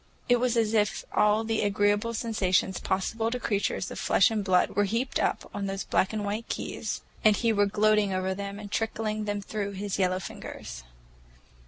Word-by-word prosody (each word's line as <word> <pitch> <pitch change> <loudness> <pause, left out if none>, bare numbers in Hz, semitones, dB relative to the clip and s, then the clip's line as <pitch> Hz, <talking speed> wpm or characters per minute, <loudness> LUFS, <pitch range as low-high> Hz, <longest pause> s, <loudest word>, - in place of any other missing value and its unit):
It 245 -1 +4
was 245 -1 +1
as 225 -1 +2
if 210 -2 +1
all 210 +1 +3
the 225 0 0
agreeable 205 +2 +1
sensations 190 -5 +1
possible 225 +4 -1
to 250 +2 -3
creatures 200 -5 -1
of - - -6
flesh 195 - +4
and 215 -2 -1
blood 185 -2 +3
were 205 +1 +2
heaped 230 +6 -1
up - - 0
on 200 -1 -3
those 195 0 -3
black 190 - +1
and 215 -1 -3
white 210 +3 -3
keys, - - -4 0.2
and 215 -1 +6
he 230 -2 +2
were 205 -1 +3
gloating 210 0 +3
over 185 0 -1
them 200 +1 -5
and 205 -1 -9
trickling 215 -1 -2
them 205 0 -2
through 200 0 -4
his 200 0 -3
yellow 185 -1 +2
fingers. - - -8
205 Hz, 190 wpm, -28 LUFS, 195-220 Hz, 0.2 s, and